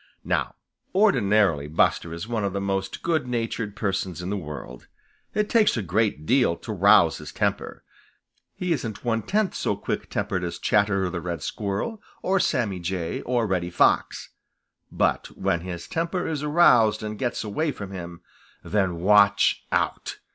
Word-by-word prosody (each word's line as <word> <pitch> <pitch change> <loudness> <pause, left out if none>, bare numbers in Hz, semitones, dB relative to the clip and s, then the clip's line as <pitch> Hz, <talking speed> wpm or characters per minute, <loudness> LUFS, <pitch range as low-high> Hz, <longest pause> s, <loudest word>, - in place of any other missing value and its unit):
Now - - -1 0.4
ordinarily 105 - +3
Buster 80 +2 +1
is 85 +5 -6
one 115 -3 -2
of 100 -2 -1
the 100 - -1
most 95 0 -3
good 160 -6 0
natured 115 -3 -3
persons 95 -4 -2
in 90 +2 -4
the - - 0
world. 75 -8 -8 0.5
It 210 0 +1
takes 215 - +3
a 110 - -1
great 95 -3 0
deal 125 - +3
to - - -7
rouse - - +5
his - - -8
temper. - - -2 0.7
He 180 -1 -3
isn't 115 -6 -5
one 115 -1 +1
tenth 210 - 0
so - - -1
quick - - -4
tempered 90 -1 -2
as 85 - -4
Chatterer 100 -3 +1
the 90 -2 -4
Red 85 -3 -4
Squirrel, 105 - -3 0.2
or 190 +1 +2
Sammy 115 - 0
Jay, 85 -1 -3
or 120 -2 +1
Reddy 90 -4 -1
Fox. - - +1 0.6
But - - -1
when 95 -3 0
his 85 -1 -6
temper 170 +2 -2
is 155 -3 -2
aroused 125 -9 +4
and 105 -1 -5
gets 120 -2 -2
away 145 +9 -1
from 100 -7 -8
him, 85 -2 -8 0.4
then 95 -5 -1
watch 100 +1 +4
out! - - -1
100 Hz, 160 wpm, -25 LUFS, 90-125 Hz, 0.7 s, rouse